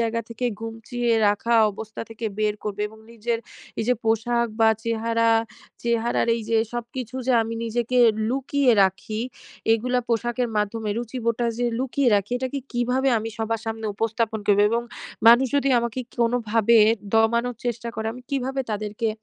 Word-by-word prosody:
জায়গা 230 Hz, 0 st, 0 dB
থেকে 230 Hz, +2 st, -2 dB
গুটিয়ে 225 Hz, +2 st, -3 dB, 0.2 s
রাখা 220 Hz, +3 st, +1 dB, 0.2 s
অবস্থা 220 Hz, +2 st, -8 dB
থেকে 225 Hz, 0 st, -5 dB
বের 210 Hz, -1 st, +1 dB
করবো? 210 Hz, -1 st, -4 dB
এবং 220 Hz, +1 st, -16 dB
নিজের 230 Hz, +1 st, -2 dB, 0.4 s
এইযে 240 Hz, +3 st, +2 dB
পোশাক 235 Hz, +2 st, +1 dB
বা 225 Hz, -, +6 dB, 0.2 s
চেহারা, 230 Hz, 0 st, +1 dB, 0.5 s
চেহারার 235 Hz, 0 st, +1 dB
এইযে 225 Hz, 0 st, -1 dB, 0.2 s
সবকিছু 240 Hz, +1 st, -5 dB
যে 260 Hz, -, +3 dB
আমি 225 Hz, +1 st, -4 dB
নিজেকে 240 Hz, +2 st, 0 dB, 0.3 s
লুকিয়ে 270 Hz, 0 st, +2 dB
রাখি 190 Hz, +3 st, -1 dB, 0.5 s
এগুলা 250 Hz, +3 st, +1 dB
পোশাকের 240 Hz, +1 st, 0 dB
মাধ্যমে 210 Hz, +1 st, -1 dB
রুচিবোধটা 235 Hz, 0 st, -2 dB
যে, 245 Hz, -, 0 dB
লুকিয়ে 265 Hz, +1 st, +1 dB
রাখি 200 Hz, +3 st, -2 dB
এটাকে 260 Hz, +2 st, -3 dB
কীভাবে 250 Hz, +2 st, +1 dB
আমি 220 Hz, +1 st, -4 dB
সবার 225 Hz, 0 st, -1 dB
সামনে 225 Hz, 0 st, -3 dB
উপস্থাপন 225 Hz, +1 st, -1 dB
করবো? 205 Hz, 0 st, +5 dB
এবং 235 Hz, +1 st, +1 dB, 0.5 s
মানুষ 240 Hz, +3 st, +7 dB
যদি 275 Hz, -1 st, +2 dB
আমাকে 235 Hz, +1 st, -2 dB
কি -, -, -20 dB
কোনোভাবে 230 Hz, -1 st, +2 dB, 0.4 s
দমানোর 235 Hz, +2 st, +2 dB
চেষ্টা 235 Hz, -1 st, -3 dB
করে 220 Hz, 0 st, -3 dB
আমি 250 Hz, +1 st, -11 dB
কীভাবে 270 Hz, 0 st, -1 dB
তাদেরকে 215 Hz, +2 st, -2 dB
230 Hz, 150 wpm, -24 LUFS, 220-245 Hz, 0.5 s, মানুষ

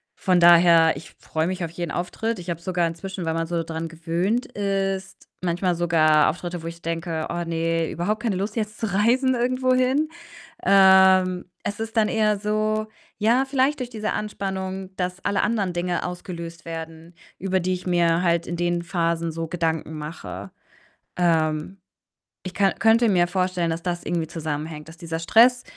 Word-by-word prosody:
von 185 Hz, -2 st, +2 dB
daher, 170 Hz, -2 st, +6 dB
ich 140 Hz, -, -10 dB
freue 160 Hz, +1 st, -2 dB
mich 185 Hz, -1 st, -3 dB
auf 165 Hz, -, -4 dB
jeden 170 Hz, -2 st, -4 dB
Auftritt. 210 Hz, +5 st, -3 dB
Ich 175 Hz, 0 st, -8 dB
habe 170 Hz, 0 st, -3 dB
sogar 175 Hz, -1 st, 0 dB
inzwischen, 180 Hz, +2 st, -6 dB
weil 160 Hz, -, 0 dB
man 165 Hz, 0 st, -2 dB
so 170 Hz, 0 st, -1 dB
dran 160 Hz, 0 st, -4 dB
gewöhnt 170 Hz, +8 st, -1 dB
ist, 195 Hz, -1 st, -3 dB
manchmal 175 Hz, 0 st, 0 dB
sogar 155 Hz, -3 st, +4 dB
Auftritte, 175 Hz, -1 st, -5 dB
wo 165 Hz, -, -5 dB
ich 170 Hz, 0 st, -8 dB
denke: 165 Hz, -1 st, -3 dB
„Oh 175 Hz, 0 st, -2 dB
ne, 165 Hz, 0 st, -1 dB
überhaupt 205 Hz, +6 st, -2 dB
keine 220 Hz, -5 st, 0 dB
Lust, 200 Hz, +3 st, -3 dB
jetzt 215 Hz, -2 st, -3 dB
zu 215 Hz, -4 st, -2 dB
reisen 250 Hz, +6 st, +3 dB
irgendwohin." 255 Hz, +4 st, +1 dB, 0.5 s
Ähm, 190 Hz, -, +5 dB, 0.2 s
es 205 Hz, +2 st, -4 dB
ist 225 Hz, +1 st, -5 dB
dann 215 Hz, -1 st, +4 dB
eher 215 Hz, -1 st, +2 dB
so 215 Hz, +1 st, -1 dB, 0.3 s
ja, 235 Hz, +5 st, +3 dB
vielleicht 270 Hz, +2 st, +1 dB
durch 250 Hz, -2 st, -4 dB
diese 220 Hz, -2 st, -3 dB
Anspannung, 190 Hz, -2 st, -4 dB
dass 180 Hz, 0 st, -3 dB
alle 200 Hz, -, +1 dB
anderen 210 Hz, -5 st, 0 dB
Dinge 175 Hz, 0 st, -2 dB
ausgelöst 170 Hz, -2 st, -7 dB
werden, 165 Hz, 0 st, -8 dB, 0.3 s
über 190 Hz, 0 st, 0 dB
die 185 Hz, +1 st, 0 dB
ich 185 Hz, 0 st, -5 dB
mir 170 Hz, -1 st, +2 dB
halt 170 Hz, -1 st, +1 dB
in 175 Hz, -, -3 dB
den 175 Hz, 0 st, 0 dB
Phasen 170 Hz, -1 st, -1 dB
so 165 Hz, +1 st, -4 dB
Gedanken 160 Hz, -2 st, -2 dB
mache. 150 Hz, -, -7 dB, 0.7 s
Ähm, 160 Hz, 0 st, +1 dB, 0.7 s
ich 185 Hz, -, -6 dB
ka 195 Hz, 0 st, +3 dB
könnte 225 Hz, +1 st, +4 dB
mir 175 Hz, -3 st, +3 dB
vorstellen, 180 Hz, -1 st, 0 dB
dass 165 Hz, +1 st, -3 dB
das 175 Hz, -1 st, -3 dB
irgendwie 170 Hz, -2 st, -1 dB
zusammenhängt, 155 Hz, -1 st, -5 dB
dass 165 Hz, -, -13 dB
dieser 165 Hz, -1 st, -5 dB
Stress 240 Hz, +8 st, +5 dB
180 Hz, 170 wpm, -24 LUFS, 165-200 Hz, 0.7 s, daher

